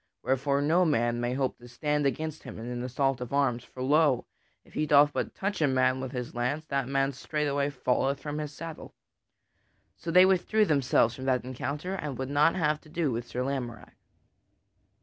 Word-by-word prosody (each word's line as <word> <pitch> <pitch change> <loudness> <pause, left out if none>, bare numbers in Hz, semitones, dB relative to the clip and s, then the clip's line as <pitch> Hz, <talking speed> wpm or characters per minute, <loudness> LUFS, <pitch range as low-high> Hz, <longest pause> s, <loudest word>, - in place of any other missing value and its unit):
Wherefore 140 +2 +1
no 165 +5 +4
man 120 -7 +1
may 120 +1 -1
hope 135 -1 -1
to 120 - -13
stand 150 +3 0
against 155 +2 -3
him 130 - -9
in 115 - -7
an 120 0 -4
assault 130 +1 0
of 125 - -5
arms; 135 -4 +1
for 130 0 -8
lo! 145 -2 +3 0.4
if - - -21
he 155 - -1
doth 145 0 +6
but - - -3
touch 200 -2 -2
a 150 - +4
man 130 -1 +2
with 130 -1 -5
his 125 -2 -5
lance 125 +6 -2
that 140 -4 -1
man 135 0 +1
straightway 145 +1 -1
falleth 135 0 0
from 150 0 -4
his 150 -1 -4
saddle." 165 +1 -9 1.0
So 170 - -7
they 180 +2 +7
withdrew 195 +3 +3
themselves 135 - +3
from 130 - -7
that 130 -2 +1
encounter 145 +7 -4
and 150 -9 -4
would 130 +1 -4
not 150 +4 +4
have 150 -4 +1
to 155 - -17
do 160 -3 0
with 120 +1 -3
Sir 125 +1 -3
Lamorack. 125 -5 -4
140 Hz, 195 wpm, -28 LUFS, 125-150 Hz, 1.0 s, they